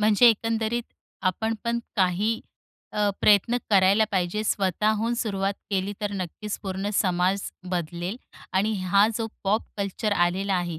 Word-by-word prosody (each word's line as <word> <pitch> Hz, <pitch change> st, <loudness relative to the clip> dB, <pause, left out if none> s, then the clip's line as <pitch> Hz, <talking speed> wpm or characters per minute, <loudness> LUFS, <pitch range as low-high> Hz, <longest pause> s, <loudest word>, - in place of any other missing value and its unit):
म्हणजे 215 Hz, +3 st, +6 dB
एकंदरीत 225 Hz, +1 st, +1 dB, 0.5 s
आपण 220 Hz, +5 st, -2 dB
पण 235 Hz, 0 st, 0 dB, 0.2 s
काही 195 Hz, +4 st, +1 dB, 0.5 s
अ, 210 Hz, -1 st, +2 dB
प्रयत्न 210 Hz, +4 st, +4 dB
करायला 195 Hz, +2 st, +5 dB
पाहिजे. 185 Hz, +3 st, 0 dB
स्वतःहून 215 Hz, +4 st, +1 dB
सुरुवात 200 Hz, -4 st, -1 dB, 0.2 s
केली 195 Hz, 0 st, 0 dB
तर 205 Hz, -1 st, -2 dB
नक्कीच 200 Hz, +3 st, -4 dB
पूर्ण 195 Hz, +1 st, -3 dB
समाज 185 Hz, +1 st, +2 dB, 0.3 s
बदलेल 175 Hz, +3 st, -3 dB, 0.4 s
आणि 210 Hz, +3 st, +2 dB
हा 200 Hz, +3 st, +4 dB
जो 225 Hz, -, -1 dB, 0.2 s
पॉप 210 Hz, +3 st, +2 dB
कल्चर 200 Hz, +1 st, -1 dB
आलेला 190 Hz, +3 st, -1 dB
आहे 175 Hz, -3 st, -2 dB
200 Hz, 135 wpm, -25 LUFS, 185-220 Hz, 0.5 s, म्हणजे